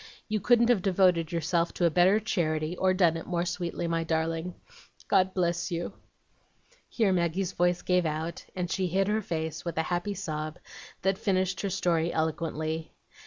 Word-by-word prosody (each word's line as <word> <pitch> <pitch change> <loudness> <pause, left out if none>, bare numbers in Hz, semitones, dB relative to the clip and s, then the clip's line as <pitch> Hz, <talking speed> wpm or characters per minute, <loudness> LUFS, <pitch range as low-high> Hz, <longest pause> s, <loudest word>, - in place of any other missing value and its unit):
You 215 0 0
couldn't 235 +3 +4
have 235 -6 +4
devoted 180 -4 +3
yourself 170 0 0
to 175 - +1
a 170 - +4
better 185 +5 +5
charity, 160 -6 -1
or 185 +1 +2
done 175 -3 +3
it 165 - -8
more 175 -1 0
sweetly, 175 0 -3
my 165 0 0
darling. 165 +2 -1 0.5
God 190 0 +3
bless 175 -1 0
you!'" 170 -1 -3 1.0
Here 215 -5 +2
Maggie's 175 +1 0
voice 175 -1 +1
gave 180 -2 +2
out, 160 +2 -4
and 180 -1 -3
she 190 -1 0
hid 190 +3 +1
her 215 +1 +1
face, 160 -4 -4
with 170 -2 -5
a 160 - +2
happy 175 +4 -1
sob, 155 -4 -4 0.5
that 190 0 +1
finished 190 -1 0
her 200 - -1
story 170 -3 +1
eloquently. 160 0 -2
175 Hz, 170 wpm, -28 LUFS, 165-190 Hz, 1.0 s, better